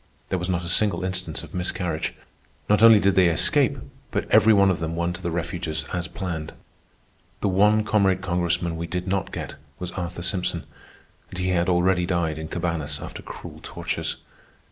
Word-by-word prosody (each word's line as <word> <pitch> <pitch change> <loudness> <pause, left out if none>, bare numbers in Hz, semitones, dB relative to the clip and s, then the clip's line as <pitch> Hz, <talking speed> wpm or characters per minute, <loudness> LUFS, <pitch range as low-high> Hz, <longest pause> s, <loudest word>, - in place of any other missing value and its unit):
There 95 - 0
was 90 +1 -3
not 85 -1 -1
a - - -5
single 95 0 +2
instance 90 -3 -3
of - - -12
miscarriage. 90 -3 -2 0.5
Not 105 0 +3
only 115 -2 +9
did 100 -1 +3
they 95 -2 +5
escape, 85 -3 +2 0.3
but - - -1
every 110 - +7
one 100 -2 +5
of 90 - -2
them 80 0 -3
won 85 +1 -1
to 85 - -8
the 85 - -2
refuges 85 -1 -3
as 90 0 -2
planned. 85 -5 -5 0.9
The - - +1
one 105 +3 +4
comrade 100 -4 +2
Congressman 85 -1 0
we 85 +1 -4
did 90 +2 -3
not 95 0 -1
get - - -6 0.2
was 90 -1 -5
Arthur 90 -1 -5
Simpson, 90 +1 -1 0.7
and 90 - -8
he 90 0 0
had 90 0 +2
already 90 0 +2
died 80 -4 0
in 80 - -5
Cabañas 80 -4 -2
after - - -7
cruel - - -9
tortures. - - -3
90 Hz, 185 wpm, -24 LUFS, 85-95 Hz, 0.9 s, only